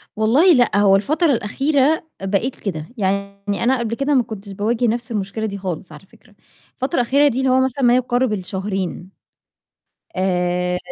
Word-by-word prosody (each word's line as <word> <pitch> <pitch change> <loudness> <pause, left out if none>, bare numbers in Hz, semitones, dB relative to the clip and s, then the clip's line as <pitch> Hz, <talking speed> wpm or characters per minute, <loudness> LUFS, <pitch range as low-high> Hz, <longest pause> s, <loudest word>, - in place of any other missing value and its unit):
والله 265 - +4
لأ، 245 -6 +3
هو 200 -1 +5
الفترة 305 - +1
الأخيرة 275 +8 +1 0.2
بقيت 205 +7 -1
كده، 160 -7 -5
يعني 200 0 -2
أنا 255 +1 +2
قبل 230 -1 -2
كده 275 +3 0
ما 255 -3 +4
كنتش 205 -3 -9
باواجه 225 +5 0
نفس 235 +1 -2
المشكلة 210 +1 -3
دي 200 -2 -4
خالص 185 -2 -5
على 150 +4 -13
فكرة، 215 0 -23 0.4
الفترة 270 +6 -3
الأخيرة 280 +5 +3
دي 260 -3 -1
اللي 265 0 +1
هو 255 +1 +4
مثلًا 265 +1 -2
ما 245 0 +5
يقارب 250 -1 +1
الشهرين. 190 -1 -4 1.1
آآ 180 -1 0
220 Hz, 165 wpm, -20 LUFS, 195-255 Hz, 1.1 s, هو